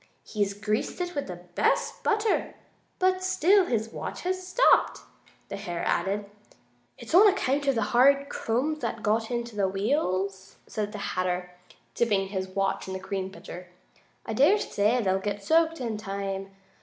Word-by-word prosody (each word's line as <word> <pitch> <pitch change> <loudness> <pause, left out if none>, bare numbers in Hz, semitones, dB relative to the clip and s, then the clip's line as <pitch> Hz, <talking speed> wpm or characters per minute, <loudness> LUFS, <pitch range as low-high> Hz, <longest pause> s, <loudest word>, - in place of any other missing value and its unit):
"He's 200 -2 -2
greased 210 - -2
it 355 0 -3
with 285 - -3
the 180 - -5
best 175 0 -1
butter, 430 0 0 0.4
but 370 0 +1
still 375 +1 +4
his 225 -2 -1
watch - - -6
has 370 0 -3
stopped," 480 +7 +3 0.5
the 200 - -6
hare 175 -4 -4
added. 195 +4 0 0.7
"It's - - -9
on 395 +5 +8
account 285 -8 +1
of 275 - +3
the 225 - +1
hard 275 +3 +5
crumbs 280 +8 -1
that 225 -6 -4
got 220 +1 +1
in 240 -1 -1
the 210 -4 -1
wheels," 195 -3 -1
said 210 -1 -4
the 210 - -6 0.2
Hatter, 180 0 -2 0.4
dipping 200 -5 +1
his 190 -1 -3
watch 195 +1 -1
in 190 - -4
the - - -4
cream 190 0 -4
pitcher. 180 -2 -10 0.6
"I 225 - -3
dare 290 - +5
say 230 - +1
they'll 190 -1 +1
get 205 0 -4
soaked 325 +4 +3
in 230 -4 -3
time. 195 -1 -4
215 Hz, 165 wpm, -27 LUFS, 195-285 Hz, 0.7 s, on